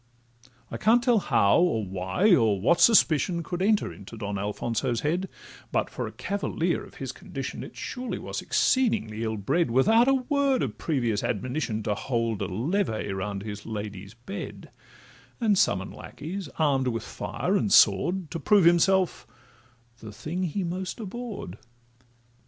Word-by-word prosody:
I -, -, -4 dB
can't 235 Hz, +2 st, +4 dB
tell 240 Hz, -3 st, +4 dB
how, 100 Hz, -, +3 dB
or 165 Hz, -, +2 dB
why, 95 Hz, -, +1 dB
or 110 Hz, -, +3 dB
what 145 Hz, -, +3 dB
suspicion 170 Hz, -, +4 dB
Could 175 Hz, +3 st, -4 dB
enter 210 Hz, +1 st, +2 dB
into 100 Hz, +3 st, -11 dB
Don 100 Hz, -2 st, -4 dB
Alfonso's 115 Hz, +3 st, -2 dB
head; 175 Hz, +6 st, -1 dB, 0.4 s
But -, -, 0 dB
for -, -, -4 dB
a -, -, -7 dB
cavalier 200 Hz, 0 st, -2 dB
of -, -, -14 dB
his -, -, -5 dB
condition -, -, -6 dB
It -, -, -11 dB
surely 250 Hz, 0 st, -4 dB
was -, -, -5 dB
exceedingly 115 Hz, -, +1 dB
ill 110 Hz, -1 st, -2 dB
bred, 140 Hz, -, +1 dB
Without 220 Hz, -, +4 dB
a 270 Hz, -, +5 dB
word 275 Hz, 0 st, +1 dB
of -, -, -4 dB
previous 120 Hz, -9 st, 0 dB
admonition, 125 Hz, 0 st, -2 dB
To 105 Hz, -, 0 dB
hold 115 Hz, -1 st, -2 dB
a -, -, -1 dB
levee 110 Hz, -, -1 dB
round 95 Hz, +1 st, -4 dB
his 105 Hz, -1 st, -6 dB
lady's 105 Hz, -1 st, -6 dB
bed, 125 Hz, +12 st, -8 dB, 0.7 s
And 220 Hz, -4 st, +3 dB
summon 95 Hz, -, +1 dB
lackeys, 175 Hz, +1 st, -7 dB
arm'd 140 Hz, -4 st, +2 dB
with 115 Hz, -2 st, -2 dB
fire -, -, -3 dB
and -, -, +1 dB
sword, 180 Hz, -3 st, +4 dB
To 165 Hz, -, -4 dB
prove 200 Hz, +4 st, +4 dB
himself 180 Hz, +2 st, +3 dB, 0.7 s
the 110 Hz, -, -9 dB
thing 170 Hz, -, -4 dB
he 185 Hz, +4 st, -2 dB
most 185 Hz, +4 st, -4 dB
abhorr'd. 215 Hz, -, -6 dB
150 Hz, 155 wpm, -26 LUFS, -, 0.7 s, a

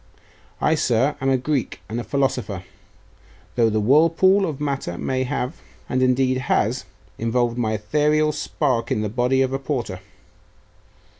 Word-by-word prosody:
I, 155 Hz, -, +2 dB
sir, 135 Hz, -1 st, +2 dB
am 135 Hz, -, +1 dB
a 135 Hz, -, +3 dB
Greek 135 Hz, 0 st, -2 dB
and 115 Hz, +2 st, -3 dB
a -, -, -3 dB
philosopher; 125 Hz, -9 st, -1 dB, 0.9 s
though 115 Hz, -2 st, +3 dB
the 110 Hz, 0 st, 0 dB
whirlpool 165 Hz, -, +4 dB
of 150 Hz, -4 st, -5 dB
matter 140 Hz, -12 st, -3 dB
may 130 Hz, 0 st, -1 dB
have, 125 Hz, +4 st, -3 dB, 0.3 s
and 130 Hz, -1 st, 0 dB
indeed 130 Hz, 0 st, +2 dB
has, 130 Hz, -, 0 dB, 0.3 s
involved 120 Hz, +1 st, 0 dB
my 110 Hz, -2 st, 0 dB
ethereal 150 Hz, +8 st, +2 dB
spark 140 Hz, -4 st, -1 dB
in 105 Hz, -, 0 dB
the 105 Hz, -, -1 dB
body 125 Hz, +4 st, +2 dB
of 130 Hz, 0 st, -2 dB
a 135 Hz, -, -1 dB
porter. 120 Hz, -9 st, -3 dB
130 Hz, 150 wpm, -22 LUFS, 115-145 Hz, 0.9 s, whirlpool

